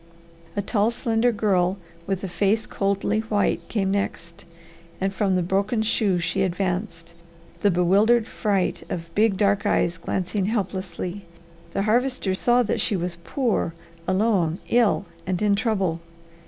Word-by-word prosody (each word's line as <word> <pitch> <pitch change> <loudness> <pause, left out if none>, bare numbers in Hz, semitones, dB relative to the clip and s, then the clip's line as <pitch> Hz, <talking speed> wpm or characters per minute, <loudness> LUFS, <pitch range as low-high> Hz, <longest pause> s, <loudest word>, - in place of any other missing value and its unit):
A 205 - -1
tall, 210 +1 +2
slender 235 0 +1
girl 195 -4 +1 0.3
with 195 -1 -2
a - - -2
face 200 +5 +1
coldly 200 +2 0
white 220 -2 0
came 195 -3 0
next, 170 -4 -3 0.5
and 195 +1 -1
from 195 -1 +1
the 180 - +1
broken 200 +5 0
shoe 210 -4 +1
she 175 +3 -1
advanced, 180 -2 -2 0.5
the 205 - +4
bewildered 200 +6 +4
fright 200 -4 -1
of 165 -1 -5
big, 210 -2 +3
dark 200 -1 +2
eyes 170 0 +1
glancing 190 +3 -2
helplessly, 190 -2 -3 0.5
the 195 - 0
Harvester 235 -2 +1
saw 240 +5 +3
that 215 - -1
she 210 - +1
was 175 -1 -2
poor, 170 - -1 0.3
alone, 185 -4 +2
ill, 235 -4 +3 0.2
and 185 -2 0
in 205 -1 +4
trouble. 195 -6 0
195 Hz, 140 wpm, -24 LUFS, 180-215 Hz, 0.5 s, the